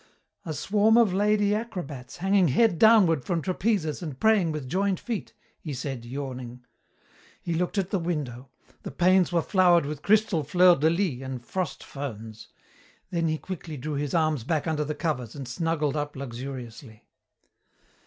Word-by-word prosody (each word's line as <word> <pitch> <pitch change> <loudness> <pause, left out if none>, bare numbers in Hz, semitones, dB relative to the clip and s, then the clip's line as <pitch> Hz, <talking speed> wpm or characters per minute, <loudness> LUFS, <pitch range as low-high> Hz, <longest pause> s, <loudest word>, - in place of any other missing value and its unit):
"A 160 - -2
swarm 210 +8 +3
of 225 -6 +4
lady 205 +1 +2
acrobats 180 - -5
hanging 195 -1 +3
head 175 - +3
downward 195 - +5
from 175 -3 -1
trapezes 185 -2 -1
and 150 -6 -6
praying 215 -7 +3
with 150 -4 -5
joined 190 +5 0
feet!" 230 -4 -5 0.2
he 150 -4 -6
said, 130 -2 -5
yawning. 125 -1 -7 0.7
He 170 - -3
looked 180 +4 -1
at 195 -2 -1
the 195 - +1
window. 140 -7 -4 0.3
The - - -6
panes 185 0 +3
were 170 -2 +1
flowered 175 -5 +4
with 145 0 -5
crystal 210 -5 +2
fleurs 175 +3 +5
de 155 +3 +4
lys 170 -7 -1
and 130 -2 -6
frost 185 +5 -3
ferns. 110 -6 -7 0.6
Then 170 -2 0
he 155 0 0
quickly 165 -3 -7
drew 150 +4 -4
his 145 +2 -2
arms 155 -6 +1
back 155 +3 -1
under 155 -2 0
the 150 +1 -4
covers 140 - -3
and 140 -3 -7
snuggled 155 +2 -1
up 145 -1 -3
luxuriously. 125 -3 -8
160 Hz, 165 wpm, -26 LUFS, 135-185 Hz, 0.7 s, downward